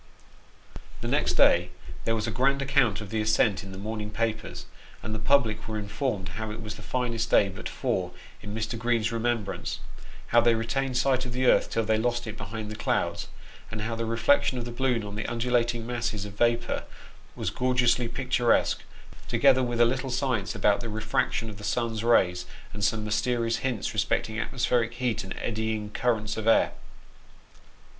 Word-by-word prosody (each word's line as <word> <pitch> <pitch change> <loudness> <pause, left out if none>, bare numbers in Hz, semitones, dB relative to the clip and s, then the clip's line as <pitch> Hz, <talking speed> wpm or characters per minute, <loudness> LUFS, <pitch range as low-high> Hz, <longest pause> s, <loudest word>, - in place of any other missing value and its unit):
The - - -3
next - - +1
day 90 +1 +5 0.4
there 115 - +2
was 110 -1 -1
a 110 - -2
grand 135 +6 +2
account 140 -6 +2
of 105 - -8
the 110 -1 0
ascent 110 -2 +2
in 95 - -9
the 95 - -8
morn 110 +2 -4
ing 105 - -5
papers, 110 0 -3 0.4
and 110 - -4
the 110 - -2
public 110 -3 +2
were 110 -1 -3
informed 105 -1 -2
how 110 +4 -5
it 105 +1 -6
was 105 -2 -5
the - - -11
finest 120 -3 -1
day 100 - +5
but 95 - -7
four - - -1 0.3
in 105 0 -6
Mr. 110 +1 -3
Green's 115 -1 +1
remembrance; 115 -3 -2 0.5
how 120 - +6
they 120 0 +4
retained 130 +3 -1
sight 130 0 +2
of 120 - -5
the 130 +1 0
earth - - +4
till 115 - 0
they 110 0 +2
lost 120 +1 0
it 110 -1 -5
behind 105 +1 -6
the - - -5
clouds - - -1
^ - - -16 0.4
and 115 -1 -5
how 115 +2 -2
the 115 0 -2
reflection 130 +4 +3
of 120 - -3
the 120 - -5
balloon 125 -2 0
on 100 -1 -6
the 105 - -3
undulating 120 -1 0
masses 115 -4 -2
of 100 - -8
vapour 120 +2 +1 0.5
was - - -2
gorgeously 125 -1 +2
picturesque; 120 -1 +1 0.5
together 135 -2 +4
with 120 -2 -1
a 120 - +7
little 130 +2 -1
science 125 -5 -1
about 105 0 +3
the 115 - -5
refraction 110 +1 -1
of 105 -2 -8
the 105 - -10
sun's 115 0 -1
rays, 90 -6 +3 0.3
and 105 0 -5
some 110 +2 +1
mysterious 115 +1 0
hints 125 -5 -2
respecting 110 0 0
atmospheric 120 -1 0
heat 125 -2 -1
and 95 - -7
eddying 110 -2 -2
currents 110 -2 0
of 110 0 -3
air. 115 - +5
115 Hz, 190 wpm, -27 LUFS, 110-120 Hz, 0.5 s, a